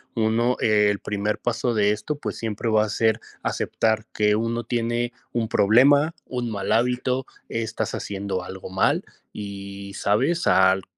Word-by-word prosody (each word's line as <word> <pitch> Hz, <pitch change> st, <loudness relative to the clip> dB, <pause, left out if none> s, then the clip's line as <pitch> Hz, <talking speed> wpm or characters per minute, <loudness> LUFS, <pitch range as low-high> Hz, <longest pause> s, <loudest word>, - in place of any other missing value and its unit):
uno, 115 Hz, +2 st, +2 dB
el 105 Hz, -2 st, +3 dB
primer 105 Hz, +1 st, -2 dB
paso 120 Hz, 0 st, -1 dB
de 105 Hz, -2 st, +3 dB
esto, 110 Hz, +8 st, -3 dB
pues -, -, -5 dB
siempre 115 Hz, 0 st, -3 dB
va 110 Hz, -1 st, +4 dB
a -, -, -5 dB
ser 110 Hz, +1 st, +2 dB, 0.2 s
aceptar 110 Hz, -1 st, 0 dB
que 105 Hz, 0 st, +3 dB
uno 115 Hz, +1 st, -1 dB
tiene 120 Hz, +1 st, -1 dB, 0.2 s
un 115 Hz, -2 st, -1 dB
problema, 140 Hz, +9 st, +5 dB
un 125 Hz, -2 st, -3 dB
mal 100 Hz, -2 st, -3 dB
hábito. 125 Hz, +3 st, +1 dB, 0.2 s
Estás 110 Hz, -1 st, -3 dB
haciendo 100 Hz, -2 st, -3 dB
algo 95 Hz, +1 st, -8 dB
mal 95 Hz, +1 st, +2 dB, 0.3 s
y 100 Hz, -1 st, -7 dB
¿sabes?, 165 Hz, +12 st, +1 dB
al 95 Hz, 0 st, +4 dB
110 Hz, 150 wpm, -24 LUFS, 100-120 Hz, 0.3 s, problema